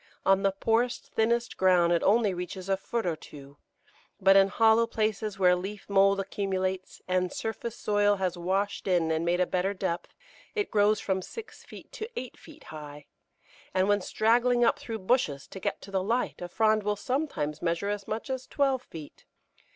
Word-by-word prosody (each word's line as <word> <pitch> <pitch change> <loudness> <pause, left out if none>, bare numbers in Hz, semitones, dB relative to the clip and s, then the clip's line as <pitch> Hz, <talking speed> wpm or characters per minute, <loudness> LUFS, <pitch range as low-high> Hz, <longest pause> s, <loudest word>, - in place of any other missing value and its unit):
On 195 0 +4
the 195 0 +2
poorest, 230 +5 0
thinnest 235 +2 0
ground 180 -2 +4
it 170 - +2
only 210 -1 +3
reaches 180 +1 -6
a 195 - +3
foot 225 +3 -3
or 170 -2 0
two; 140 -2 -13 0.6
but 195 -1 +5
in 195 0 +7
hollow 225 +2 +4
places 215 -2 -2
where 180 -2 +5
leaf 195 +3 -6
mould 195 0 +4
accumulates 190 -1 -3
and 185 0 0
surface 225 +1 -4
soil 205 -2 +2
has 185 -2 -1
washed 190 +4 -2
in 175 -3 +2
and 160 +1 0
made 175 +1 +1
a 180 - +3
better 185 +3 -1
depth, 185 -2 -3 0.4
it 415 -2 -1
grows 210 0 +3
from 190 -1 -1
six 445 - -10
feet - - -13
to 435 +1 -6
eight 255 - -8
feet 310 -1 -15
high, 150 -1 -9 0.7
and 185 +1 +3
when 205 0 +3
straggling 240 +5 +2
up 285 - +2
through 230 -5 -5
bushes 185 - 0
to 190 - -8
get - - -3
to 195 - -11
the 190 -1 0
light 230 +3 -1
a 175 - -4
frond 215 +3 +2
will 210 0 -1
sometimes 205 - -2
measure 170 +4 -1
as 205 -1 -4
much 225 +5 -4
as 260 -1 -4
twelve 270 -3 +1
feet. 160 - -12
195 Hz, 185 wpm, -28 LUFS, 180-225 Hz, 0.7 s, in